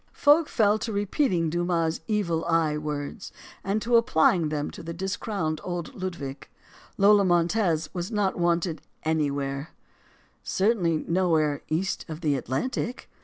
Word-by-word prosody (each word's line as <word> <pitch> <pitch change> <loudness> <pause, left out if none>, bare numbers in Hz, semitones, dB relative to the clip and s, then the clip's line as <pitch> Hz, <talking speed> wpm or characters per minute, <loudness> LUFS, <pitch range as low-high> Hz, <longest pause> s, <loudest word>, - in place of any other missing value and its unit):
Folk 295 +2 +4
fell 215 -1 +3
to 225 +1 -3
repeating 200 - +1
Dumas' 170 -1 0
"evil 185 -7 0
eye" 165 -3 +2
words, 150 +5 -5 0.3
and 200 +3 0
to 235 0 +4
applying 175 -8 +3
them 150 -1 -2
to - - -10
discrowned 170 -1 -3
old 175 -2 -4
Ludwig. 170 -8 -6 0.5
Lola 200 +1 +6
Montez 175 -2 +2
was 175 +1 -3
not 205 -3 0
wanted 170 -1 0 0.2
anywhere; 145 -2 -1 0.7
certainly 190 -6 +1
nowhere 160 -5 +2
east 175 +5 -1
of 160 +1 -6
the 150 -4 +1
Atlantic. 235 - -3
175 Hz, 125 wpm, -26 LUFS, 155-200 Hz, 0.7 s, Lola